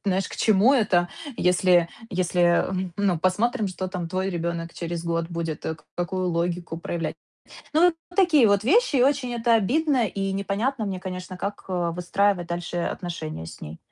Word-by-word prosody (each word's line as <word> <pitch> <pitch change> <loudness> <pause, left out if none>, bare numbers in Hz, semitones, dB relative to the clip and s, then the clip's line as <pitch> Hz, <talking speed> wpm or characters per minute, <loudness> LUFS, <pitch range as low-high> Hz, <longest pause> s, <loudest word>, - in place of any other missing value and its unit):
знаешь, 190 -1 0
к - - -8
чему 220 +5 +4
это? 185 -7 +2 0.3
Если 180 -1 +4 0.2
если, 175 -1 +2 0.3
ну, 190 -5 +2
посмотрим, 210 +5 +1
что 185 +1 -4
там 180 -3 -4
твой 185 +2 -1
ребёнок 170 -1 -3
через 170 0 -4
год 165 0 -1
будет, 165 -2 -4
к 160 0 -5
какую 185 +1 -1
логику 170 0 -2
проявлять. 170 -1 -3 0.6
Ну, 345 +2 +5 0.2
такие 325 - +5
вот 200 0 +3
вещи. 395 - +3
И 250 - +5
очень 270 -3 +1
это 235 0 +3
обидно 260 +3 +2
и 195 +1 -2
непонятно 210 +5 -1
мне, 190 -2 -3
конечно, 185 0 -6
как 200 +2 -5
выстраивать 180 +1 0
дальше 175 0 -4
отношения 165 - -4
с - - -11
ней. 75 +2 -8
185 Hz, 160 wpm, -25 LUFS, 170-215 Hz, 0.6 s, Ну